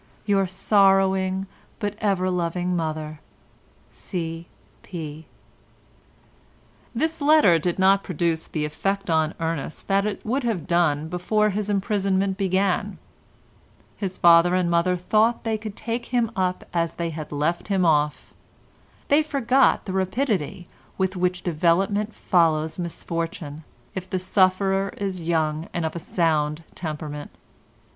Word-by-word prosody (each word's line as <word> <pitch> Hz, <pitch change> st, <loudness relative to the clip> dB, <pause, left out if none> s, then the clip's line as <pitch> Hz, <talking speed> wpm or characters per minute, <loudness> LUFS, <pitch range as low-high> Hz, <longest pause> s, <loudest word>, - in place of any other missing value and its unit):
—Your 195 Hz, -2 st, +2 dB
sorrowing 190 Hz, 0 st, +3 dB, 0.3 s
but 205 Hz, -2 st, -2 dB
ever 190 Hz, -3 st, +1 dB
loving 180 Hz, 0 st, -1 dB
mother, 155 Hz, -2 st, -3 dB, 0.7 s
C. 165 Hz, -2 st, -5 dB, 0.3 s
P." 160 Hz, -3 st, -8 dB, 1.7 s
This 320 Hz, +5 st, -1 dB
letter 285 Hz, -, +5 dB
did 175 Hz, +2 st, -1 dB
not 195 Hz, +1 st, +4 dB
produce 170 Hz, -2 st, -1 dB
the 150 Hz, -2 st, -2 dB
effect 195 Hz, +5 st, -2 dB
on 160 Hz, -1 st, +1 dB
Ernest 165 Hz, -2 st, -4 dB
that 195 Hz, +1 st, +2 dB
it 205 Hz, -, -5 dB
would 255 Hz, +5 st, 0 dB
have 220 Hz, -9 st, -1 dB
done 160 Hz, -4 st, +1 dB
before 210 Hz, +5 st, +1 dB
his 205 Hz, +1 st, -3 dB
imprisonment 195 Hz, -1 st, +1 dB
began. 190 Hz, -1 st, 0 dB, 1.0 s
His 190 Hz, -3 st, -4 dB
father 170 Hz, +1 st, +6 dB
and 180 Hz, -2 st, +1 dB
mother 175 Hz, +2 st, +2 dB
thought 215 Hz, +6 st, +2 dB
they 220 Hz, -1 st, -1 dB
could 215 Hz, -2 st, -7 dB
take 235 Hz, +1 st, -4 dB
him 240 Hz, -2 st, 0 dB
up 185 Hz, -2 st, -1 dB
as 170 Hz, -1 st, 0 dB
they 170 Hz, -1 st, -2 dB
had 155 Hz, -1 st, -7 dB
left 150 Hz, +4 st, -1 dB
him 195 Hz, -3 st, +1 dB
off. 150 Hz, -2 st, +1 dB, 0.7 s
They 290 Hz, +2 st, +5 dB
forgot 270 Hz, -4 st, +2 dB
the 190 Hz, -, -4 dB
rapidity 190 Hz, -, -1 dB, 0.3 s
with 190 Hz, 0 st, 0 dB
which 180 Hz, 0 st, -1 dB
development 190 Hz, +6 st, +1 dB
follows 160 Hz, -2 st, +1 dB
misfortune, 165 Hz, -3 st, -4 dB, 0.3 s
if 185 Hz, -1 st, -6 dB
the 185 Hz, -, -1 dB
sufferer 195 Hz, +1 st, +1 dB
is 190 Hz, -3 st, -3 dB
young 160 Hz, -1 st, -1 dB
and 170 Hz, -2 st, -1 dB
of 160 Hz, -, -3 dB
a -, -, -3 dB
sound 155 Hz, -2 st, 0 dB
temperament. 150 Hz, -3 st, -6 dB
185 Hz, 130 wpm, -24 LUFS, 165-200 Hz, 1.7 s, father